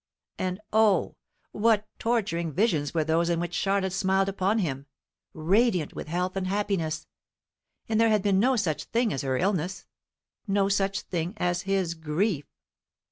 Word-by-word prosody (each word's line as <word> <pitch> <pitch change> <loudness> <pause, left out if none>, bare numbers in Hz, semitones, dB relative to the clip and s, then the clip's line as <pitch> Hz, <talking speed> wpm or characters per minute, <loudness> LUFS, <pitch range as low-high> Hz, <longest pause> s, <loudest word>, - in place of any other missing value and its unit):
And 185 +1 -2
O, 215 -2 +3 0.4
what 215 -1 +2
torturing 195 -8 0
visions 160 -5 +1
were 160 -2 +1
those 165 +2 +1
in 170 -1 +1
which 175 0 -3
Charlotte 195 -1 0
smiled 190 0 +2
upon 195 +2 0
him, 140 -8 -2 0.5
radiant 180 +1 +2
with - - -7
health 180 +3 -2
and 190 -1 -2
happiness; 190 -6 -1 0.8
and 225 0 +2
there 230 - +5
had 215 -3 +2
been 195 -2 +3
no 255 +5 +3
such 180 -10 -1
thing 230 -2 0
as 135 - -2
her 130 -1 -1
illness, 180 0 -1 0.6
no 195 0 +2
such 195 0 0
thing 175 +3 -3
as 180 +1 -1
his 190 -4 +1
grief. 160 +1 -1
190 Hz, 155 wpm, -27 LUFS, 170-205 Hz, 0.8 s, there